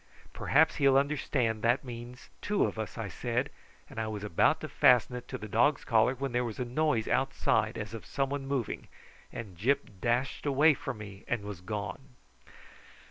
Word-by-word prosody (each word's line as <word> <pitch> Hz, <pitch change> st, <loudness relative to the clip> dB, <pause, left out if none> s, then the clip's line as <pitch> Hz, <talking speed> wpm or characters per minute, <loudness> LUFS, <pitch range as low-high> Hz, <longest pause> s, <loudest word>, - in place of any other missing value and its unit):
"Perhaps 160 Hz, +3 st, +3 dB
he 140 Hz, -, +4 dB
will 135 Hz, 0 st, +6 dB
understand 135 Hz, -5 st, 0 dB
that 120 Hz, +3 st, +2 dB
means 120 Hz, 0 st, -9 dB
two 205 Hz, 0 st, +1 dB
of -, -, -4 dB
us," 110 Hz, -, -5 dB
I 115 Hz, -3 st, -3 dB
said; 120 Hz, -, -2 dB, 0.4 s
and -, -, -8 dB
I 110 Hz, -, -1 dB
was 105 Hz, -1 st, -5 dB
about 105 Hz, -6 st, +3 dB
to -, -, -4 dB
fasten 125 Hz, 0 st, +4 dB
it 125 Hz, -, -7 dB
to -, -, -5 dB
the 110 Hz, -, -7 dB
dog's 120 Hz, +7 st, +2 dB
collar, 115 Hz, +2 st, +3 dB
when 135 Hz, +1 st, -3 dB
there 120 Hz, +1 st, +1 dB
was 115 Hz, -3 st, -4 dB
a 125 Hz, -, -2 dB
noise 125 Hz, -2 st, 0 dB
outside 130 Hz, -4 st, +1 dB
as 105 Hz, 0 st, -5 dB
of 115 Hz, -, -8 dB
some 135 Hz, -1 st, -1 dB
one 140 Hz, -1 st, -3 dB
moving, 135 Hz, -5 st, -2 dB, 0.4 s
and 105 Hz, -6 st, -7 dB
Gyp 115 Hz, 0 st, -1 dB
dashed 125 Hz, +5 st, 0 dB
away 145 Hz, +3 st, +5 dB
from 135 Hz, -4 st, -5 dB
me 100 Hz, -2 st, -10 dB
and 120 Hz, -4 st, -1 dB
was 100 Hz, -4 st, -7 dB
gone. 105 Hz, +7 st, -6 dB
120 Hz, 190 wpm, -30 LUFS, 110-135 Hz, 0.4 s, will